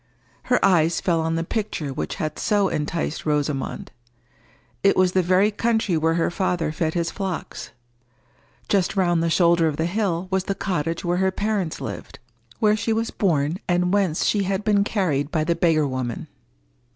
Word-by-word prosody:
Her 250 - +3
eyes 170 -3 +3
fell 170 -3 +1
on 165 0 -1
the 165 - -1
picture 170 -8 -3
which - - -4
had 155 -5 -4
so 205 -3 +2
enticed 150 +1 -3
Rosamond. 150 -2 -2 0.9
It 195 - +3
was 185 -1 +4
the 185 - +2
very 185 +4 +3
country 220 -3 0
where 160 +1 +1
her 170 0 +1
father 175 -4 -1
fed 160 +1 -2
his 170 -1 -1
flocks. 190 -4 -5 1.0
Just 195 -1 +1
round 175 -3 +2
the 165 - +1
shoulder 170 0 +3
of 150 -2 -2
the 160 - 0
hill 185 -2 -1
was 190 0 0
the 195 - -2
cottage 165 -3 -2
where 175 +1 +1
her 190 +1 +2
parents 200 -4 -2
lived, - - -7 0.4
where 210 -1 +3
she 220 +1 -1
was 225 +1 -1
born 160 -3 0
and 180 +1 +1
whence 190 -6 +1
she 205 - +2
had 195 +1 -1
been 205 -2 +3
carried 160 -10 0
by 155 -2 0
the 170 +2 +1
beggar 160 -4 +2
woman. 130 -3 -4
175 Hz, 175 wpm, -23 LUFS, 160-195 Hz, 1.0 s, was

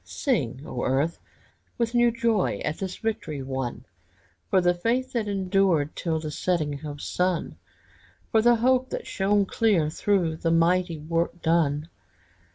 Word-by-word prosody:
Sing, 140 - -2
O 125 - -4
earth, 140 +6 0 0.6
with 235 0 -1
new 240 0 +5
joy 230 -4 0
At 150 - -2
this 190 -2 -4
victory 155 - -3
won! 130 -2 -4 0.6
For 190 - +4
the 175 -1 +3
faith 235 +8 -1
that 230 -3 -1
endured 190 -6 +1
Till 160 -2 -1
the 155 -1 -5
setting 150 -4 -1
of 145 -1 -6
sun! 180 -1 -1 0.7
For 220 - +4
the 240 +1 +5
hope 255 +2 +2
that - - -5
shone 200 +1 +1
clear 190 -8 +2
Through 175 -3 0
the 165 - -1
mighty 170 +1 +2
work 165 +3 -2
done! 155 -2 +1
175 Hz, 150 wpm, -26 LUFS, 155-210 Hz, 0.7 s, new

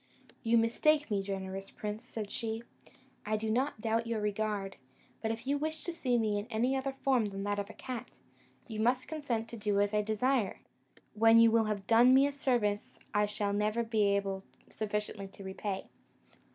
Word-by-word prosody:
"You 230 0 +3
mistake 290 +5 +3
me, 200 -1 +2
generous 195 0 -5
prince," 210 +2 -5
said 215 -3 -6
she; 225 0 -3 0.6
"I 215 +1 0
do 220 0 -2
not 255 0 0
doubt 225 +1 0
your 230 -1 -1
regard; 210 -1 -2 0.4
but 220 - -1
if 225 +2 -4
you 285 +2 +1
wish 315 +1 -3
to 345 - -4
see 255 -7 +1
me 215 -3 +1
in 205 - -6
any 245 +3 +1
other 270 0 -1
form 255 -5 +3
than 195 -1 -4
that 205 0 -1
of 200 +1 -4
a - - -9
cat, 255 -3 -6 0.6
you 220 -3 -5
must 245 +3 +2
consent 255 -8 -2
to 235 - -7
do 205 -1 +1
as 205 +1 +2
I 210 - +3
desire, 220 +1 0 0.5
when 225 +1 +6
you 230 0 +7
will 225 -1 +4
have 205 -2 -2
done 240 +4 +6
me 270 +1 +6
a 285 - +1
service 240 -7 0 0.2
I 210 0 +3
shall 205 -1 -1
never 210 +3 +1
be 215 -3 +2
able 195 -1 -2 0.3
sufficiently 210 -2 -3
to 195 +1 -12
repay." 190 0 -4
220 Hz, 190 wpm, -32 LUFS, 205-240 Hz, 0.6 s, you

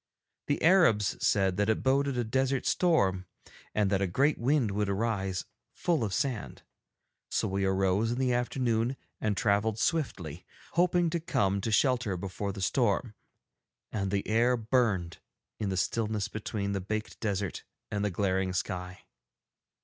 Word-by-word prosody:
The 145 - 0
Arabs 155 - +4
said 95 -3 +2
that 105 +1 +1
it 110 - +1
boded 135 0 +2
a 120 - +1
desert 130 +3 0
storm, 95 - +2 0.5
and 105 -2 +2
that 100 -1 +2
a 100 - +2
great 135 - +2
wind 130 -3 +2
would 105 0 -1
arise 100 -3 -1 0.3
full 165 -8 +1
of 105 - -2
sand. 125 0 -2 0.7
So - - 0
we 95 0 -1
arose 95 +3 +1
in 120 - -2
the 130 -1 +1
afternoon, 120 0 0 0.2
and 105 -2 -1
travelled 110 -2 +1
swiftly, 95 - -2 0.3
hoping 175 -1 +2
to 170 - 0
come 100 - 0
to 115 - -2
shelter 115 -5 +2
before 100 +2 -4
the 95 -1 -5
storm. 110 +2 +1 0.8
And 100 -3 -2
the 100 0 -1
air 120 +3 +3
burned 110 -7 0 0.4
in 105 - -1
the 95 - -2
stillness 105 +1 0
between 105 -2 -3
the 100 -1 -2
baked 110 +3 -4
desert 100 -4 -2 0.3
and 105 -1 -1
the 105 - +1
glaring 95 0 0
sky. 90 0 -4
105 Hz, 155 wpm, -29 LUFS, 95-125 Hz, 0.8 s, Arabs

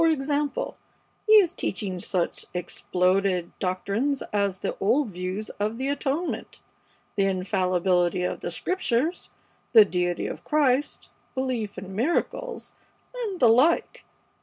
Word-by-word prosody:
For 330 - +5
example, 290 -1 -1 0.5
he 430 - +6
is 385 -5 +7
teaching 190 - -3
such 175 -1 -2
exploded 180 +1 0
doctrines 200 +9 -1
as 200 -2 +1
the - - -3
old 230 +4 +2
view 185 +2 -4 0.2
of 215 +2 -1
the 265 +2 -2
atonement, 285 +4 -2 0.6
the 195 - +2
infallibility 185 -1 +1
of - - -2
the - - -4
Scriptures, 335 -3 -1 0.4
the 220 -3 +9
deity 180 -2 -1
of - - -5
Christ, 290 -2 +1 0.3
belief 250 -6 -2
in 190 +1 -7
miracles, 340 - -1 0.4
and 445 -7 -4
the 245 - +6
like. 260 +9 +3
215 Hz, 125 wpm, -26 LUFS, 185-285 Hz, 0.6 s, the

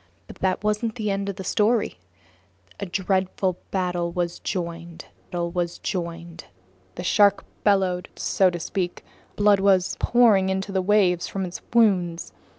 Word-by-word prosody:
But - - -12
that 190 +1 -1
wasn't 210 +1 0
the 215 -4 -2
end 195 0 -2
of 200 - -4
the 190 - -7
story. 210 - +1 0.8
A 200 - -4
dreadful 190 0 -1
battle 180 -2 -1
was 175 -1 -2
joined. 170 -2 -5 0.3
The 170 -1 -4 0.6
shark 200 +1 +3 0.2
bellowed, 190 -3 +2
so 190 -1 +2
to 175 -1 -5
speak. 180 +1 -3 0.3
Blood 205 -1 +4
was 190 -2 +3
pouring 220 -6 +4
into 190 +1 -2
the 190 -1 +1
waves 185 -3 +2
from 195 -1 -3
its 175 - -7
wounds. 185 -7 +2
190 Hz, 135 wpm, -24 LUFS, 175-200 Hz, 0.8 s, Blood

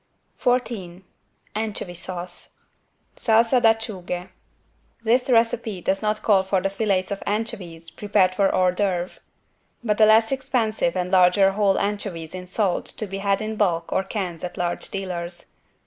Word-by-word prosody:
14 225 - -1 0.5
ANCHOVY 215 -4 -4
SAUCE 175 0 -5 0.6
(Salsa 230 +2 +3
d'Acciughe) 205 -6 0 0.7
This 245 +3 +2
recipe 230 -4 +2
does 190 +2 -1
not 215 0 -1
call 200 -3 +4
for 190 0 0
the 195 +1 -1
filets 195 -2 0
of 200 - -3
anchovies 180 -6 -4
prepared 200 -3 +2
for 195 0 +2
=hors 185 -1 +2
d'oeuvre=, 185 -3 -1 0.6
but 210 -2 0
the 215 - +7
less 225 +2 +5
expensive 230 -9 0
and 180 0 -2
larger 190 +1 +5
whole 200 -1 +2
anchovies 200 -6 -3
in 180 0 -7
salt 190 -1 0
to 215 - -3
be 195 -1 -6
had 200 +1 0
in 215 0 -4
bulk 170 -5 0
or 190 - +1
cans 190 -4 -4
at 180 - -5
large 175 -1 -2
dealers. 175 -3 -5
195 Hz, 145 wpm, -23 LUFS, 180-220 Hz, 0.7 s, the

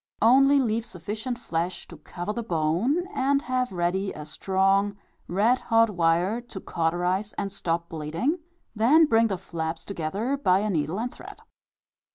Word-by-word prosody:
Only 275 +5 +6
leave 230 -3 0
sufficient 220 +6 -5
flesh 175 -5 -3
to 170 - -11
cover 175 +6 -5
the 235 - -3
bone, 185 - 0
and 275 -1 +1
have 255 0 -1
ready 185 +2 -1
a 150 - -8
strong 195 +5 +1 0.3
red 220 +8 +2
hot 230 -1 +3
wire, 175 +5 +1
to 235 -5 -9
cauterize 180 +5 -1
and 195 - -3
stop 170 -3 -2
bleeding, 165 - -2 0.4
then 275 +10 +5
bring 230 -5 +3
the 195 -4 -2
flaps 165 -2 -5
together 200 - -2
by 185 -10 +3
a 215 0 -1
needle 160 +3 -1
and 245 +2 -3
thread. - - -12
200 Hz, 155 wpm, -26 LUFS, 170-235 Hz, 0.4 s, Only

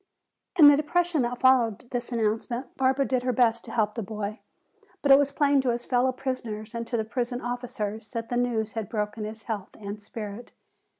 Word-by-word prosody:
In 305 -4 +10
the 290 - +9
depression 325 +1 +1
that 245 0 -1
followed 245 -4 +3
this 245 0 -3
announcement 235 +3 -2
Barbara 265 +1 +2
did 255 -2 0
her 250 0 0
best 235 -1 +2
to - - -8
help 210 -2 +1
the 230 - -4
boy. 210 +1 -5 0.6
But 280 - +4
it 270 - +9
was 285 -1 +1
plain 285 -1 +3
to 260 - 0
his 240 0 -1
fellow 255 +1 +2
prisoners 235 -5 -5
and 230 0 -4
to 235 - -1
the 220 - -1
prison 245 +1 -2
officers 225 -4 -4
that 230 0 -5
the 245 - -1
news 230 -3 0
had 225 -3 -4
broken 210 -1 -3
his 220 +1 -8
health 210 -4 -5
and 205 0 -6
spirit. 210 +2 -8
240 Hz, 200 wpm, -27 LUFS, 220-260 Hz, 0.6 s, In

